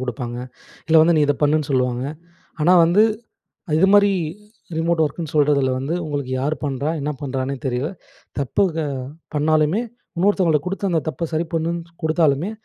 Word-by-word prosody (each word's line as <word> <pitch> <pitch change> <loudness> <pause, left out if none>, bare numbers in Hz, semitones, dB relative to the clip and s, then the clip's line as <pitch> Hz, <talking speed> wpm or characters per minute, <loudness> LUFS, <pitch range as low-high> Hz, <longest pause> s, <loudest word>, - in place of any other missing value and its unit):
குடுப்பாங்க. 120 -1 -4 0.5
இல்ல 160 0 +5
வந்து 165 +1 +4
நீ 155 - +4
இத 145 - +2
பண்ணுன்னு 150 0 +2
சொல்லுவாங்க. 125 -1 0 0.6
ஆனா 175 +4 +5
வந்து 175 +6 +4 0.7
அ - - -1
இதுமாதிரி 200 +2 +5 0.7
ரிமோட் 165 0 +1
ஒர்க்குன்னு 155 +1 -4
சொல்றதில 145 -3 +3
வந்து, 140 +5 -2
"உங்களுக்கு 140 -3 -3
யார் 145 +4 0
பண்றா? 140 +1 -1
என்னா 150 +2 -2
பண்ணுறான்னே 135 0 -2
தெரியல. 130 +3 -1 0.5
தப்பு 140 +7 0
க - - -2 0.6
பண்ணாலுமே, 155 +5 +2 0.4
இன்னொருத்தவங்களுக்கு 175 -5 +2
குடுத்து 195 +1 -2
அந்த 160 - +2
தப்ப 165 +2 -3
சரி 165 +2 0
பண்ணுன்னு 170 +1 -2
குடுத்தாலுமே, 160 +2 +2
155 Hz, 145 wpm, -21 LUFS, 140-170 Hz, 0.7 s, இல்ல